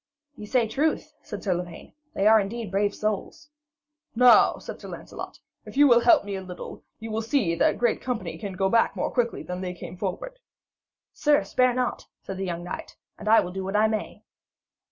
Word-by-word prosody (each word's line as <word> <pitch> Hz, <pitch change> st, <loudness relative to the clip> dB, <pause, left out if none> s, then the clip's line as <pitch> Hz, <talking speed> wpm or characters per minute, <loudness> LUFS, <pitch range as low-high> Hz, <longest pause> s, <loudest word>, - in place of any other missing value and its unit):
'Ye 210 Hz, -, -9 dB
say 240 Hz, 0 st, +2 dB
truth,' 290 Hz, +8 st, -1 dB
said -, -, -8 dB
Sir 190 Hz, -, +1 dB
Lavaine; 175 Hz, -1 st, -7 dB, 0.2 s
'they 195 Hz, -, 0 dB
are 220 Hz, +1 st, +7 dB
indeed 215 Hz, 0 st, -4 dB
brave 200 Hz, +1 st, +1 dB
souls.' 215 Hz, +9 st, -4 dB, 0.6 s
'Now,' 250 Hz, +1 st, +6 dB
said -, -, -9 dB
Sir -, -, -9 dB
Lancelot, -, -, -8 dB, 0.3 s
'if -, -, -9 dB
you 290 Hz, 0 st, +7 dB
will 240 Hz, -2 st, +6 dB
help 320 Hz, -, +5 dB
me 200 Hz, -, -5 dB
a 190 Hz, -, -4 dB
little, 180 Hz, -1 st, -9 dB, 0.2 s
you 225 Hz, 0 st, -7 dB
may 220 Hz, +1 st, -1 dB
see 225 Hz, -6 st, +1 dB
that 170 Hz, -, +2 dB
great 240 Hz, -, +1 dB
company 250 Hz, -3 st, -3 dB
go 195 Hz, -2 st, -2 dB
back 230 Hz, +4 st, +2 dB
more -, -, -2 dB
quickly 240 Hz, -2 st, -1 dB
than 180 Hz, +1 st, -5 dB
they 180 Hz, -1 st, -4 dB
came 180 Hz, -, -9 dB
forward.' 205 Hz, -, -5 dB, 0.7 s
'Sir, 295 Hz, -8 st, +3 dB
spare 250 Hz, +5 st, +2 dB
not,' 250 Hz, -1 st, -2 dB, 0.2 s
said 195 Hz, -, -6 dB
the 195 Hz, -, -3 dB
young 175 Hz, -1 st, -4 dB
knight, 175 Hz, -, -7 dB, 0.2 s
'and 215 Hz, -, -8 dB
I 225 Hz, -, +7 dB
will 180 Hz, -, -5 dB
do 190 Hz, +1 st, -5 dB
what 195 Hz, +2 st, -4 dB
I 215 Hz, +1 st, +4 dB
may.' 215 Hz, -1 st, -4 dB
215 Hz, 200 wpm, -25 LUFS, 190-240 Hz, 0.7 s, are